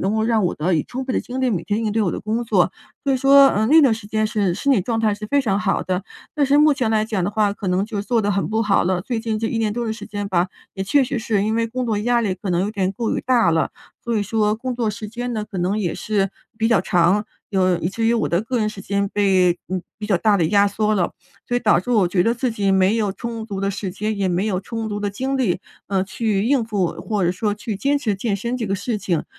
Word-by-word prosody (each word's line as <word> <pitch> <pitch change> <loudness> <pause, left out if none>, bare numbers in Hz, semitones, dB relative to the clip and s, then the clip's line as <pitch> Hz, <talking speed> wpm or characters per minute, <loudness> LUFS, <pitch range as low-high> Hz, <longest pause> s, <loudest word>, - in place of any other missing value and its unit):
能 195 +4 0
够 220 - +1
让 225 -3 +2
我 175 - 0
得 165 +5 -1
以 155 -3 +2
充 260 +2 -5
分 260 - -3
的 - - +1
精 255 +1 -5
力 260 -1 +2
每 180 -6 -1
天 215 +2 -1
应 215 - 0
对 225 - +1
我 185 - +1
的 - - -4
工 220 +3 -1
作。 195 -6 +2 0.3
所 275 - +2
以 - - +2
说， 275 +1 +7
嗯， 220 -2 +1
那 315 +3 +7
段 270 -5 +5
时 220 -1 -5
间 215 +1 0
是 205 -5 0
身 280 +9 +1
体 235 - +3
状 225 +5 -2
态 220 -2 +2
是 210 +1 -7
非 285 +6 +2
常 200 -7 0
好 210 -2 0
的。 185 0 -2 0.3
但 290 -2 +2
是 280 +2 +4
目 300 0 +6
前 255 -5 -1
来 215 -1 +2
讲 215 -4 -2
的 190 - -1
话， 210 -1 +1
可 200 - -7
能 180 +2 +1
就 210 -1 -4
做 225 +2 0
得 205 - +1
很 200 -1 0
不 220 +1 0
好 205 -2 +2
了， 180 0 0
最 235 +5 -3
近 225 -1 -2
这 225 - -1
1 230 - -2
年 220 -2 0
多 240 +2 -2
的 220 - -2
时 220 - -8
间 205 -1 -4
吧， 180 -1 +1 0.3
也 190 - -3
确 280 +8 +3
实 260 0 -2
是 220 -3 0
因 215 +2 0
为 230 0 +1
工 250 +2 -3
作 220 -3 0
压 240 +3 +2
力 205 -5 0
可 185 +1 -5
能 175 0 +1
有 200 +3 -1
点 195 -3 -1
过 230 +2 -2
于 - - -1
大 240 -8 +3
了， 160 -1 +1 0.3
所 235 -1 0
以 210 - +1
说 210 0 +1
工 250 +3 -4
作 235 -2 -1
时 215 0 -5
间 245 +3 -4
呢， 215 -2 -2
可 200 -3 -7
能 180 +4 0
也 180 -6 -1
是 200 -3 -1 0.3
比 225 0 +1
较 230 - +4
长， 180 +2 +2 0.3
有 185 -3 +2
以 170 - -1
至 225 +4 -3
于 230 - +3
我 230 - 0
的 170 - +1
个 240 +4 -2
人 215 - +1
时 215 -2 -8
间 200 0 -1
被， 185 -3 +3
呃， 185 0 -2 0.2
比 215 - -5
较 205 -3 +2
大 210 +3 +3
地 175 - +1
压 200 0 +4
缩 215 +1 0
了。 180 -4 +1 0.4
所 245 - +1
以 - - 0
导 210 -7 +4
致 215 - -6
我 215 -6 +4
觉 180 0 +2
得 230 - +2
自 245 +1 -1
己 200 -3 0
没 190 +2 +3
有 210 -3 0
充 230 +1 -5
足 200 -3 -5
的 195 - 0
时 200 -1 -4
间， 215 +4 -3
也 195 -2 0
没 180 +3 0
有 190 -4 -1
充 225 +2 -5
足 205 -1 -4
的 205 -1 -1
精 265 +7 -2
力， 220 -10 +1 0.3
呃， 190 -1 +1
去 205 0 -1
应 255 0 +2
付， 205 -5 0
或 210 -4 -1
者 175 - +2
说 205 +3 -1
去 210 +1 -5
坚 280 +8 +1
持 225 -8 -1
健 200 +2 -2
身 235 +5 -3
这 240 - -3
个 195 - 0
事 225 +3 -2
情。 175 -6 -1
215 Hz, 315 characters per minute, -21 LUFS, 195-230 Hz, 0.4 s, 说